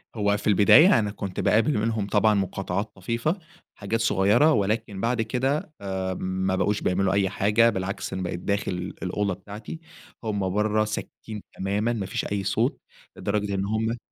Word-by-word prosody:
هو 105 -1 +1
في - - -5
البداية، 120 - +7
أنا 105 -2 -1
كُنت 100 -2 -6
باقابل 115 +6 +3
منهم 110 -1 -1
طبعًا 105 +1 +3
مقاطعات 95 +1 -2
طفيفة، 115 - -2 0.4
حاجات 110 +3 -2
صُغيرة 110 +7 +4
ولكن 105 -2 -1
بعد 120 0 +1
كده 135 +7 -1
آمم، 95 -1 -2
ما 95 - +2
بقوش 105 +2 0
بيعملوا 95 +1 +1
أي 100 -1 +2
حاجة، 105 +5 +3
بالعكس 100 -2 -3
أنا 95 - -3
بقيت 85 -1 -3
داخل 100 +2 -1 0.3
الأوضة 100 +2 -1
بتاعتي، 100 - -9 0.4
هُم 100 -4 -1
برّه، 105 +2 +1
ساكتين 105 0 -6
تمامًا، 105 +5 0
ما 105 -4 -3
فيش 95 - -3
أي 100 -1 -2
صوت، 110 +6 0 0.4
لدرجة 100 -1 -1
إن 95 0 -1
هُم 110 +3 -1
105 Hz, 160 wpm, -25 LUFS, 95-110 Hz, 0.4 s, البداية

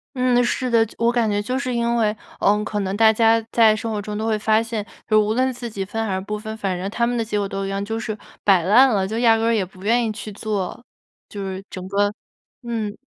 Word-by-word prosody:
嗯， 250 -1 +3
是 250 +1 -1
的。 230 -1 +4
就 - - -14
我 235 +1 +2
感 235 -3 +1
觉 205 0 0
就 255 +5 -2
是 255 -2 -2
因 235 0 0
为， 215 -2 +2 0.3
嗯， 210 +1 +3
可 210 -1 -2
能 195 +1 -2
大 220 -1 +6
家 225 +1 +4
在 225 -2 +5
生 225 +1 -4
活 210 -2 -2
中 210 +1 -5
都 220 - -2
会 220 -1 +1
发 220 +1 +2
现， 225 -2 -4 0.2
就 215 -1 +4
无 215 - 0
论 260 +2 +1
自 240 -1 -5
己 195 -3 -4
分 225 +3 -3
还 195 - -1
是 190 - -1
不 210 +2 -4
分， 220 +1 -6
反 195 -4 -2
正 185 +2 -4
他 235 +1 +1
们 245 0 -1
的 230 - 0
结 210 -1 -2
果 200 - -1
都 195 0 -4
一 195 - -3
样， 195 0 -2
就 225 +1 -3
是 215 -1 -4 0.3
摆 190 -4 +4
烂 235 +9 +6
了， 195 -5 +1
就 220 +2 -3
压 225 -2 +5
根 225 - -1
儿 230 - +3
也 210 -4 +1
不 185 +1 -16
愿 235 +2 +2
意 220 - -1
去 215 0 -7
做， 210 +2 -4 0.5
就 205 - -7
是 190 0 -5
整 185 0 -7
个 205 +1 +1 0.5
嗯。 225 -3 -3
220 Hz, 295 characters per minute, -22 LUFS, 205-230 Hz, 0.5 s, 大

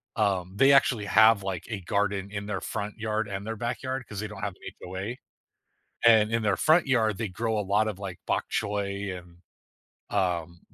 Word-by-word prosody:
um, 95 -4 0
they 135 +6 +6
actually 125 -5 +4
have, 110 -1 +5
like, 95 -3 -4
a 105 -4 -4
garden 100 +1 -1
in 100 -1 -4
their 100 -2 -3
front 105 +1 -4
yard 110 -1 -1
and 100 +1 -5
their 110 -1 -4
backyard 125 +2 -3
'cause 100 -2 -7
they 110 - -3
don't 95 - -10
have 100 -2 -2
an - - -28 0.2
HOA, 95 +7 -5 0.9
and 110 -2 +6
in 115 - +2
their 100 -3 +2
front 155 -1 +4
yard, 110 -6 +2
they 110 -4 -3
grow 110 +3 -2
a - - +1
lot 105 +2 +1
of, 100 -3 -4
like, 95 -3 -6
bok - - 0
choy 100 -2 -2
and, 85 -1 -14 0.8
um, 85 -3 -1
105 Hz, 195 wpm, -27 LUFS, 95-110 Hz, 0.9 s, they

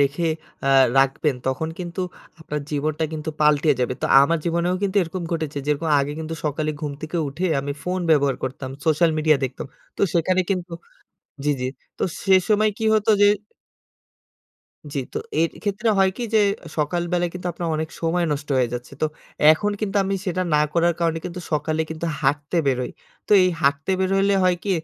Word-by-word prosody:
রেখে 145 +4 +1 0.4
আ - - +3 0.3
রাখবেন, 135 +2 +2
তখন 130 +5 -1
কিন্তু 175 0 -5 0.4
আপনার 150 -2 -4
জীবনটা 155 +2 -1
কিন্তু 160 0 -4
পাল্টে 150 0 +4
যাবে। 125 0 0
তো, - - +2 0.2
আমার 165 +4 +2
জীবনেও 170 +1 +1
কিন্তু 200 0 -1
এরকম 175 +2 -5
ঘটেছে। 155 -3 -2
যেরকম, 150 +2 0
আগে 140 +1 -2
কিন্তু 160 0 -4
সকালে 150 +1 -1
ঘুম 150 -2 -3
থেকে 155 +2 -4
উঠে, 165 +7 -4 0.2
আমি 140 +1 -3
ফোন 180 +3 -2
ব্যবহার 140 -3 +3
করতাম। 130 0 -4
সোশ্যাল 160 +1 +3
মিডিয়া 155 -1 +4
দেখতাম। 130 0 -5 0.3
তো, - - -2
সেখানে 180 +2 +2
কিন্তু 180 -2 -2 0.7
জি, 150 - +1
জি। - - -1 0.3
তো - - -2 0.2
সে 190 -1 +5
সময় 215 0 +4
কি 225 - -4
হতো 215 0 +1
যে - - +8 1.7
জি। 145 - -2
তো - - -2 0.2
এর 165 - +3
ক্ষেত্রে 210 +2 -1
হয় 190 0 +4
কি - - -4
যে, - - +6 0.4
সকাল 160 +3 0
বেলায় 175 -1 +1
কিন্তু 180 0 -6
আপনার 170 0 -4
অনেক 160 0 -2
সময় 170 +1 +1
নষ্ট 145 0 -5
হয়ে 125 -2 +2
যাচ্ছে। 120 0 -7
তো, - - +4 0.5
এখন 205 +6 0
কিন্তু 210 -2 -2
আমি 195 +1 -1
সেটা 185 0 0
না 150 - +4
করার 170 +1 +2
কারণে 165 -1 +1
কিন্তু, 180 0 -5
সকালে 155 +1 0
কিন্তু 160 +1 -4 0.2
হাঁটতে 145 +4 0
বেরোই। 125 -2 0 0.4
তো, - - +1
এই 185 - +3
হাটতে 140 +5 +1
বেরোইলে 195 +1 +2
হয় 180 -1 +3
কি, 205 - -1
160 Hz, 185 wpm, -23 LUFS, 145-180 Hz, 1.7 s, যে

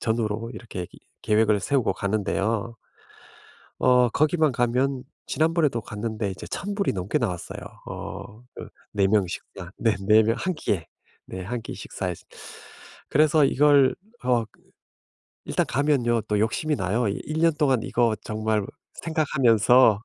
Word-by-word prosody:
전후로 110 0 -1
이렇게 105 -6 -6
이 - - -15 0.2
계획을 105 -1 +3
세우고 135 +1 +1
가는데요. 110 +2 -1 1.0
어 125 -1 +4
거기만 155 +2 +2
가면 125 +2 0 0.2
지난번에도 155 -7 +1
갔는데 110 0 -4
이제 95 - -8
1,000 200 +1 -4
불이 200 -1 0
넘게 95 0 -1
나왔어요. 90 -3 -3 0.3
어 110 +4 -8
그 - - -8 0.3
4 100 -1 +3
명 100 -1 +3
식사. 90 0 -8
네. 115 -2 +2
4 110 +1 +6
명 115 +2 +1
1 185 -1 -1
끼에. 95 - -2 0.4
네 95 - -7
1 120 +5 -4
끼 115 - -7
식사에서. - - -5 0.9
그래서 150 0 +4
이걸 140 -1 +4 0.3
어 120 -2 +3 1.0
일단 - - 0
가면요. 130 -4 +1
또 105 - +1
욕심이 150 +7 0
나요. 105 +4 0
이 100 - -2
1 155 +1 -3
년 165 -2 +4
동안 135 -7 +2
이거 115 -2 +1
정말 110 -1 -1 0.3
생각하면서. 125 -8 +3
115 Hz, 255 characters per minute, -25 LUFS, 105-140 Hz, 1.0 s, 4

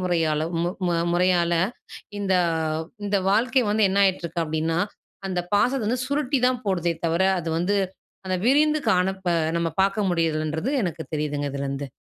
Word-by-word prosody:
முறையாலோ 160 -4 +1 0.7
முறையால, 175 -1 +2 0.7
இந்த 195 -2 0 0.7
இந்த 200 0 +1
வாழ்க்கை 255 +5 +3
வந்து 210 0 +3
என்னாயிட்ருக்கு 185 -3 +1
அப்டின்னா, 160 +1 -1 0.5
அந்த 185 -2 -1
பாசத்தை 250 +4 +2
வந்து 245 +2 0
சுருட்டி 280 -1 0
தான் 255 -1 -1
போடுதே 175 -4 0
தவிர, 165 +3 +1 0.2
அது 165 -1 -4
வந்து, 180 +5 +1 0.5
அந்த 185 0 0
விரிந்து 300 +4 +4
காணப்ப 190 +1 0 0.3
நம்ம 170 0 0
பாக்க 195 +2 +1
முடியுறதில்லன்றது 160 - -1
எனக்கு 170 -3 -3
தெரியுதுங்க, 145 -1 -2
இதுலருந்து. 140 0 -3
180 Hz, 130 wpm, -24 LUFS, 165-205 Hz, 0.7 s, விரிந்து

